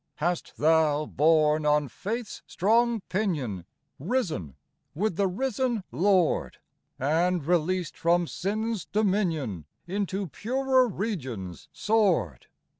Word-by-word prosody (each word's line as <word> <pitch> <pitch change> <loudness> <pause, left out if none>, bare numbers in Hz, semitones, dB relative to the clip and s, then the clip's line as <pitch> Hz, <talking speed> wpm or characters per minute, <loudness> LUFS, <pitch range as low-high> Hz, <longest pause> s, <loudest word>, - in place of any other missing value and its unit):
Hast 175 +3 -2
thou, 155 -1 +3
borne 155 0 +3
on 150 -1 +2
faith's 220 - -5
strong 230 +4 +2
pinion, 150 - -2 0.3
Risen 155 - -2 0.4
with 200 +2 0
the 200 +2 +2
risen 250 +2 -1
Lord! 180 +5 +2 0.4
And, 165 +4 +1
released 175 +1 0
from 175 +1 +2
sin's 215 +3 -2
dominion, 170 - -1 0.2
Into 195 +1 -2
purer 255 - +1
regions 130 - -5
soared 180 - +1
180 Hz, 100 wpm, -27 LUFS, 150-210 Hz, 0.4 s, thou